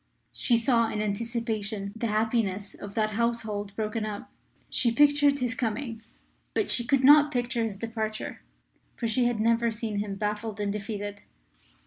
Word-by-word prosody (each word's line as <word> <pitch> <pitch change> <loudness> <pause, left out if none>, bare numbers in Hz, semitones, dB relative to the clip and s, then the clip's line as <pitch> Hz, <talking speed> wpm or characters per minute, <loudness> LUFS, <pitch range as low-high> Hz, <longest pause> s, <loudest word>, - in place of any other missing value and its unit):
She 235 - +2
saw 230 -1 +3
in 210 - -3
anticipation 215 -1 -2
the 230 +1 -2
happiness 215 -2 0
of 200 0 -9
that 215 -1 +1
household 215 -3 -2
broken 215 +1 -2
up. 210 -1 -6 0.4
She 235 - +2
pictured 290 +2 +4
his 250 -3 -1
coming, 230 -1 -3 0.5
but 425 - +1
she 240 - +4
could 265 +2 +2
not 295 +2 +7
picture 245 -2 0
his 220 -3 -2
departure. 220 0 -4 0.5
For 235 - -4
she 230 +2 +2
had 240 -2 0
never 230 +1 +3
seen 220 -2 -3
him 205 -1 -3
baffled 210 +1 -3
and 205 -1 -1
defeated. 205 -1 -5
225 Hz, 155 wpm, -27 LUFS, 210-235 Hz, 0.5 s, not